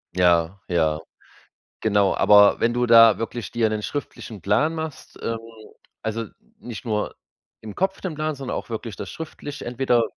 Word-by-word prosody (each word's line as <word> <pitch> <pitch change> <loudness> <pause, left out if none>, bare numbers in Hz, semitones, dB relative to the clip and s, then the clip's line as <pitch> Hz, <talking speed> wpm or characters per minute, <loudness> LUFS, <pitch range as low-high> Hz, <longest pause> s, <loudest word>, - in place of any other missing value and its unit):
Ja, 90 +1 +2
ja, 80 -3 +1 0.8
genau. 100 -3 +2
Aber 105 0 +6
wenn 115 - +2
du 120 +1 +1
da 115 -2 +7
wirklich 115 -1 -4
dir 115 -2 +1
'nen 110 0 -2
schriftlichen 115 -5 -6
Plan 105 - +2
machst, 160 -2 -7
ähm 115 0 -2 0.7
also, 110 +1 -2 0.3
nicht 120 0 -8
nur 105 -3 -2 0.5
im 110 -2 -8
Kopf 190 +1 -1
den 185 -4 -3
Plan, 155 +1 -2
sondern 135 -2 -5
auch - - -9
wirklich 115 -1 -5
das - - -7
schriftlich. 150 -2 -8
Entweder 120 -1 +1
115 Hz, 160 wpm, -23 LUFS, 105-135 Hz, 0.8 s, da